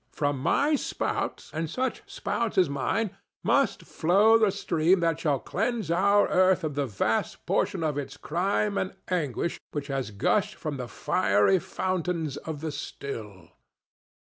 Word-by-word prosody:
From 145 -2 -1
my 280 - +2
spout, 290 - -2
and 160 0 -2
such 255 +6 -2
spouts 230 -4 -2
as 185 - +5
mine, 190 +9 -1 0.3
must - - +2
flow 200 +7 +4
the 220 -2 +5
stream 180 -2 +2
that 165 -1 +1
shall 150 -4 +1
cleanse 220 - -2
our 200 +4 +4
earth 185 -1 +4
of 155 -2 -2
the 140 -1 -1
vast 110 +1 -1
portion - - 0
of 150 -2 0
its 140 - -6
crime 200 +5 0
and 190 - -3
anguish 170 -3 -1
which 145 -1 -4
has 135 -5 -2
gushed 200 - +1
from 155 -3 -4
the 125 -2 -5
fiery 105 - +2
fountains 175 -5 -2
of 155 -3 -6
the 160 -1 -3
still. 110 - -7
165 Hz, 150 wpm, -27 LUFS, 140-195 Hz, 0.3 s, as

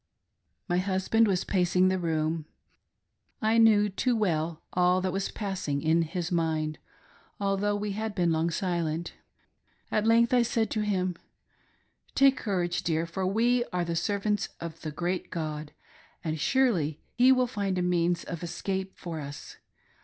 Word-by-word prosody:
> - - -50
My 175 -1 +1
husband 190 +4 +2
was 185 -3 +1
pacing 180 0 +2
the 185 0 0
room; 160 -1 -1 0.9
I 220 +1 +3
knew 215 -2 +6
too 240 +5 0
well 165 -6 -1
all 180 +1 +3
that 185 -1 -1
was 195 0 -1
passing 185 -9 -3
in 160 +2 +3
his 170 +1 -3
mind, 160 -2 0 0.6
although 200 +1 +1
we 205 0 -2
had 215 +1 -4
long 165 -2 +2
been - - +1
silent. 170 -2 -2 0.8
At 215 +1 +1
length 230 +1 +4
I 250 - +5
said 225 -2 0
to 215 - 0
him: 185 -4 0 0.5
" - - -37
Take 275 0 +6
courage, 180 -4 -1
dear, 165 0 0
for 185 +3 -2
we 240 +5 +2
are 180 -5 -2
the 170 0 -2
servants 205 +2 0
of 165 -1 -7
the 155 - -4
great 175 +4 -2
God, 155 -2 -4 0.5
and 160 -1 -2
surely 230 - +1
He 250 +2 +5
will 255 -1 +4
find 200 -6 -2
a 180 - +1
means 175 -1 +1
of 170 - -6
escape 190 +2 -4
for 165 -2 -5
us. 145 0 -8
185 Hz, 160 wpm, -28 LUFS, 165-210 Hz, 0.9 s, knew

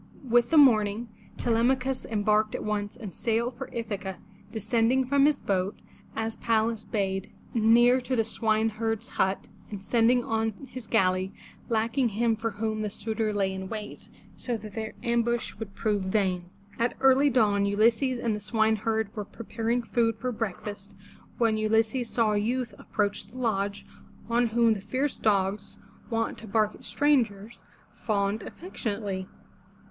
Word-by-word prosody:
With 240 0 +4
the 325 - +3
morning 225 -4 +5 0.3
Te 240 - -1
lem'a 235 +4 +4
chus 260 +1 -3
embarked 215 0 +1
at - - -4
once 205 -1 -2
and 215 -7 -8
sailed 235 +2 -1
for 270 +2 -7
Ithaca, 205 -5 -4 0.3
descending 230 +4 +1
from 280 +2 +4
his 295 -2 +2
boat, 190 0 -1 0.4
as 225 0 -3
Pallas 225 -1 +1
bade, 195 -2 -2 0.2
near 240 +3 +5
to 255 +1 -2
the 225 - +3
swineherd's 225 0 0
hut, 190 +1 0 0.2
and 200 -2 -8
sending 240 +2 +3
on 225 -1 0 0.2
his 255 -3 -7
galley, 185 0 +2 0.4
lacking 230 +3 +1
him 225 +2 +1
for 225 +1 -2
whom 215 +1 -2
the 210 - -1
suitors 215 +1 -2
lay 195 -1 +1
in 190 0 -6
wait, 215 -2 -7 0.3
so 240 -2 -2
that 215 -1 -10
their 220 0 -5
ambush 235 0 0
would 205 -3 -7
prove 210 -3 0
vain. 190 -2 0 0.3
At 235 +1 0
early 270 +2 +5
dawn 205 -5 +3
Ulysses 230 +5 +2
and 235 -2 -1
the - - -4
swineherd 220 0 0
were 210 - -3
preparing 230 +2 -2
food 230 -1 +1
for 250 +3 -2
breakfast 205 -2 -5 0.4
when 225 -2 +2
Ulysses 225 +3 +1
saw 225 -3 +2
a 210 - +1
youth 240 +3 -1
approach 205 -1 -2
the 255 - -13
lodge, 205 -4 -1 0.4
on 235 +1 +2
whom 230 0 +3
the 200 - -5
fierce 260 +7 -1
dogs, 200 -1 0 0.3
wont 225 -1 -1
to 220 - -10
bark 215 0 +1
at - - -15
strangers, 230 -4 +1 0.3
fawned 205 -1 -1
affectionately. 205 - -4
225 Hz, 155 wpm, -27 LUFS, 205-235 Hz, 0.4 s, morning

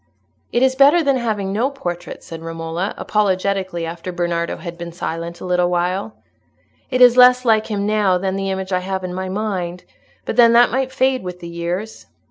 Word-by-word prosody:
"It 240 - +2
is 260 0 +4
better 285 +5 +5
than 275 -2 +2
having 210 -5 -2
no 235 +6 +1
portrait," 175 -11 -6
said 165 -1 -9
Romola, 165 +3 -4
apologetically, 190 -3 -1
after 170 +2 -6
Bernardo 175 -1 -2
had 170 -2 -7
been 170 0 -7
silent 170 0 -5
a - - -6
little 180 -1 +1
while. 180 +4 -1 0.7
"It 255 -1 0
is 245 0 +7
less 250 0 +6
like 220 -2 +3
him 205 -2 -2
now 210 -3 +2
than 190 +1 -2
the 195 0 -2
image 190 0 -4
I 180 - +2
have 190 0 -4
in 180 -1 -4
my 185 +1 -4
mind, 185 -3 -3 0.4
but - - -4
then 235 -1 +7
that 240 +1 +5
might 260 +1 -1
fade 260 0 +1
with 180 -1 -7
the 170 - -8
years." 175 +6 -5
190 Hz, 195 wpm, -19 LUFS, 175-230 Hz, 0.7 s, is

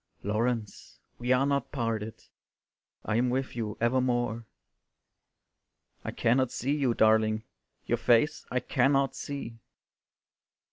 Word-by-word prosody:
"Laurence, 110 +1 -2 0.2
we 120 +1 -1
are 130 +2 +4
not 140 -3 0
parted, 115 -4 -3 0.8
I 110 - 0
am 125 +1 +2
with 130 0 -2
your 110 -3 -3
evermore." 120 -2 0 1.6
"I - - -4
cannot 125 +2 +2
see 140 +4 -1
you, 135 -5 +1
darling, 110 0 +3 0.4
Your - - 0
face 120 +6 +3
I 125 - 0
cannot 135 +3 +2
see." 130 -5 -6
120 Hz, 110 wpm, -29 LUFS, 115-130 Hz, 1.6 s, are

